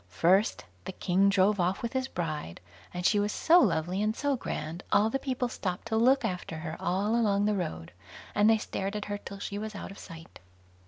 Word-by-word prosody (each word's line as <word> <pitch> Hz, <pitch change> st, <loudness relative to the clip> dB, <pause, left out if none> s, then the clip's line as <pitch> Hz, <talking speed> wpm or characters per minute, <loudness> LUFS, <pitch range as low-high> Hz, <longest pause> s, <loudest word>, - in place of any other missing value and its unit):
First, 185 Hz, -, +2 dB, 0.2 s
the 190 Hz, -, -5 dB
king 190 Hz, +2 st, +2 dB
drove 200 Hz, +1 st, +3 dB
off 180 Hz, +4 st, 0 dB
with 235 Hz, -, -3 dB
his 260 Hz, 0 st, -1 dB
bride, 155 Hz, -, -4 dB, 0.3 s
and 180 Hz, 0 st, -5 dB
she 205 Hz, -, +4 dB
was 205 Hz, +1 st, 0 dB
so 340 Hz, +10 st, +5 dB
lovely 180 Hz, -, +1 dB
and 215 Hz, +1 st, 0 dB
so 285 Hz, 0 st, 0 dB
grand, 165 Hz, -7 st, -5 dB
all 215 Hz, +2 st, +4 dB
the 270 Hz, -, 0 dB
people 255 Hz, -2 st, -2 dB
stopped 185 Hz, -5 st, -4 dB
to 220 Hz, -, 0 dB
look 260 Hz, +5 st, +4 dB
after 180 Hz, -3 st, -4 dB
her 160 Hz, 0 st, -5 dB
all 195 Hz, +5 st, 0 dB
along 205 Hz, -3 st, +2 dB
the 210 Hz, -, +2 dB
road, 80 Hz, -, -4 dB, 0.4 s
and 205 Hz, +1 st, +4 dB
they 225 Hz, -, +5 dB
stared 200 Hz, -1 st, -4 dB
at 210 Hz, -, -3 dB
her 205 Hz, 0 st, -4 dB
till 200 Hz, -, -9 dB
she 200 Hz, +1 st, -5 dB
was 215 Hz, 0 st, -6 dB
out 195 Hz, -, -7 dB
of 195 Hz, -, -11 dB
sight. 165 Hz, -2 st, -12 dB
200 Hz, 215 wpm, -29 LUFS, 180-220 Hz, 0.4 s, so